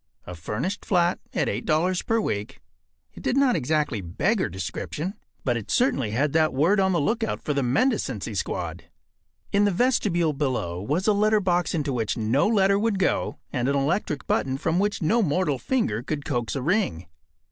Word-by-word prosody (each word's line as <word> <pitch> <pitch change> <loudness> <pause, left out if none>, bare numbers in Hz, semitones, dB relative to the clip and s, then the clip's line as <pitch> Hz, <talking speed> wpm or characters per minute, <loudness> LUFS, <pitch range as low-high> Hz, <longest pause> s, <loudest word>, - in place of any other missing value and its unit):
A 90 - -7
furnished 105 - -4
flat 175 -3 +2
at - - 0
$8 155 - 0
per 225 0 +2
week. 105 - -3 0.5
It - - -11
did 255 - 0
not 275 -3 +4
exactly 150 - 0
beggar 185 - 0
description, 145 - -4 0.3
but 120 -3 +1
it 110 - -7
certainly 140 - +2
had 135 +7 0
that 155 -3 +2
word 170 +9 +3
on 190 0 +3
the 175 - +2
lookout 225 +9 -1
for 150 - -1
the 140 - 0
mendicancy 135 - 0
squad. - - -3 0.7
In 200 0 +3
the - - +4
vestibule 180 -7 +1
below 125 - -2
was 150 - -1
a 215 - +4
letter 215 +1 +3
box 180 -3 0
into 145 -4 -1
which 115 -4 -1
no 115 - +2
letter 200 -2 +3
would 220 -1 +1
go, 190 - 0 0.2
and 125 -1 0
an 140 - +1
electric 140 -1 -1
button 130 0 0
from 160 +5 0
which 205 -2 0
no 225 +10 +3
mortal 150 - 0
finger 120 - 0
could 145 +2 -4
coax 120 -4 -2
a 135 - -2
ring. 155 - 0
155 Hz, 180 wpm, -25 LUFS, 130-200 Hz, 0.7 s, not